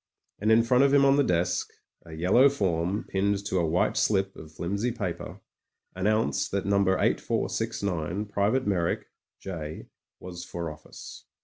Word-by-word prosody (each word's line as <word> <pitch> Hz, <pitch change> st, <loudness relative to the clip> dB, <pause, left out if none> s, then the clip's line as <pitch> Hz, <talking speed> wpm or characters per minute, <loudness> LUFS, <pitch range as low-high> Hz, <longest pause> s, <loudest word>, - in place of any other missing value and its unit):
And 110 Hz, +2 st, +2 dB
in 115 Hz, +1 st, +6 dB
front 125 Hz, +3 st, +4 dB
of 140 Hz, -, +4 dB
him 140 Hz, -1 st, +5 dB
on 135 Hz, 0 st, +5 dB
the 145 Hz, -, +4 dB
desk, 90 Hz, -2 st, 0 dB, 0.4 s
a 80 Hz, -, -10 dB
yellow 95 Hz, -, +4 dB
form 95 Hz, -4 st, -1 dB
pinned 100 Hz, +1 st, 0 dB
to 95 Hz, -, -1 dB
a 85 Hz, -, +1 dB
white 85 Hz, +3 st, +1 dB
slip 95 Hz, -2 st, +1 dB
of 80 Hz, -1 st, -11 dB
flimsy 100 Hz, +9 st, -2 dB
paper, 115 Hz, -, -5 dB, 0.5 s
announced 110 Hz, +4 st, 0 dB
that 100 Hz, -1 st, -1 dB
No. 100 Hz, 0 st, +2 dB
8469, 95 Hz, -1 st, -1 dB
Private 105 Hz, +5 st, 0 dB
Meyrick, 90 Hz, -4 st, 0 dB, 0.3 s
J., 80 Hz, -5 st, -7 dB, 0.3 s
was 90 Hz, -1 st, -8 dB
for 85 Hz, -3 st, -5 dB
office. 75 Hz, 0 st, -12 dB
95 Hz, 150 wpm, -27 LUFS, 85-110 Hz, 0.5 s, in